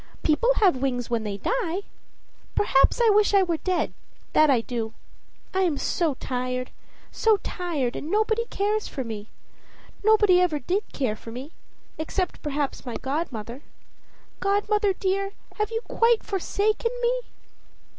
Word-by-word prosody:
People 330 +11 +3
have 380 - +4
wings 245 -3 -1
when 230 -2 +1
they 205 -2 -3
die 390 - -1 0.7
perhaps; 275 - +4
I 465 -2 +5
wish 410 0 +4
I 390 - +6
were 340 -3 0
dead, 365 +1 -1 0.4
that 310 -1 +6
I 255 -4 +4
do. 230 -2 -4 0.6
I 380 - +2
am 340 -6 +2
so 325 -4 0
tired, 255 0 -3 0.4
so 445 -2 +3
tired; 310 -9 -2
and 305 - -5
nobody 435 +3 +2
cares 420 -1 -1
for 265 - -4
me. 215 -3 -6 0.8
Nobody 415 -4 +5
ever 345 -4 +2
did 370 - -2
care 250 -6 -1
for 230 - -10
me, 260 +6 -7 0.5
except 360 +4 -2
perhaps 290 -2 -2
my 245 -3 -5
godmother. 265 -4 -4 0.8
Godmother, 410 +1 +2
dear, 390 +1 -1 0.2
have 425 -1 0
you 450 0 -2
quite 460 -1 +2
forsaken 425 +3 0
me?" - - +2
355 Hz, 145 wpm, -25 LUFS, 260-415 Hz, 0.8 s, I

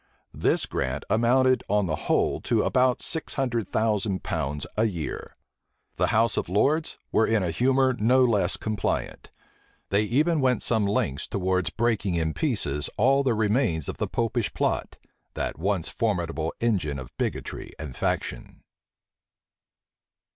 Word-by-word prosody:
This - - +1
grant 65 -1 -3
amounted 130 +3 +3
on 105 0 +2
the 80 -3 -1
whole - - +2
to - - +1
about 125 -1 +2
six 160 - -1
hundred 120 -7 -1
thousand 105 -3 0
pounds 75 -3 -2
a 110 - +2
year. 85 -9 -4 0.6
The - - +2
house 115 0 +2
of - - -1
lords 145 - +1
were 110 - +3
in 110 -3 +2
a 85 - -1
humor 130 +7 +2
no 125 +3 +4
less 100 -6 +2
compliant. 110 -3 -3 0.6
They 100 +1 +3
even 150 +9 +2
went 130 -1 +2
some 110 -4 +2
lengths 70 -9 -1
towards 95 -1 0
breaking 110 -5 0
in 80 -1 0
pieces 75 - -1
all 135 +6 +4
the 130 -4 +1
remains 105 - +1
of - - -5
the - - 0
Popish 115 -2 -1
plot, - - -1 0.4
that - - -3
once 95 -1 0
formidable 85 -7 -1
engine[*] 95 -12 0
of 65 -1 -10
bigotry - - -3
and 75 -5 -7
faction. - - -3
105 Hz, 145 wpm, -26 LUFS, 85-125 Hz, 0.6 s, no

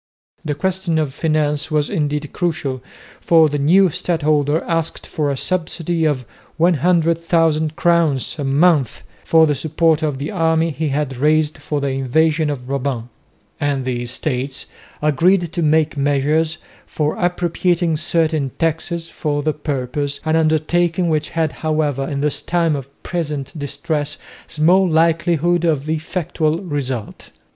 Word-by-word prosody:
The 150 -2 -2
question 185 +1 -1
of 150 -4 -1
finance 150 -1 0
was 150 -2 +1
indeed 150 -5 -2
crucial, 155 -7 -2 0.4
for 160 -2 +4
the 145 0 -2
new 180 +6 +4
stadholder 150 -2 +1
asked 165 -1 -2
for 150 -2 -2
a 140 - -1
subsidy 170 0 -1
of 140 -5 0 0.3
100,000 165 -1 +2
crowns 165 -6 +1
a - - -1
month 140 - +2 0.2
for 160 -1 +5
the 150 - +1
support 160 +3 +1
of 150 -4 -1
the 140 +3 -4
army 165 -3 +1
he 155 +1 -2
had 140 -2 -2
raised 155 +2 +2
for 150 - -3
the 140 0 -1
invasion 155 +4 +1
of 135 -4 -4
Brabant; 130 -3 -3 0.5
and 140 -2 -1
the 125 -2 -2
Estates 130 +2 -3 0.4
agreed 170 +6 +3
to 175 - -1
take 155 0 +2
measures 145 +3 +1 0.3
for 150 0 -1
appropriating 175 -1 +1
certain 155 -2 0
taxes 165 +1 -1
for 145 -3 -2
the 155 0 +1
purpose, 145 -1 -3
an 155 0 +2
undertaking 165 +2 +1
which 155 -1 0
had, 160 -2 0
however, 150 -4 -1
in 140 -2 -2
this 150 0 0
time 170 -3 +1
of 135 -1 -6
present 150 -6 -3
distress 145 +1 -3 0.3
small 180 +5 +3
likelihood 165 +1 +2
of 155 -4 0
effectual 160 0 -1
result. 135 - -4
155 Hz, 140 wpm, -19 LUFS, 145-165 Hz, 0.5 s, for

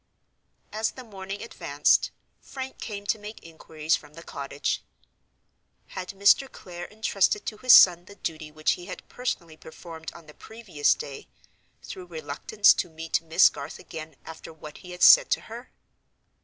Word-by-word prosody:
As 220 +2 -1
the 255 - -11
morning 195 -3 -7
advanced, 145 -10 +1 0.3
Frank 265 -1 -8
came 205 -2 -6
to 215 - 0
make 210 +1 -10
inquiries 160 -1 -2
from 150 - -12
the 165 - -11
cottage. 140 -1 -3 1.1
Had 185 - -7
Mr. 200 +7 +3
Clare 175 -1 -9
intrusted 210 -2 0
to 215 - -5
his 255 +3 +3
son 175 -1 +8
the 200 - -14
duty 155 -5 -5
which 155 0 0
he 175 - -5
had - - -9
personally 170 -10 -4
performed 160 +1 -10
on 170 - -14
the 150 - -14
previous 195 -10 -1
day 140 - -8 0.6
through 185 -1 -9
reluctance 160 +6 +2
to 180 - -3
meet 160 0 -2
Miss 165 0 +5
Garth - - -8
again 160 -1 -9
after 160 0 -10
what 155 -1 -12
he 180 - -13
had 180 0 -4
said - - +8
to - - +1
her? 235 +3 -10
175 Hz, 160 wpm, -26 LUFS, 160-210 Hz, 1.1 s, son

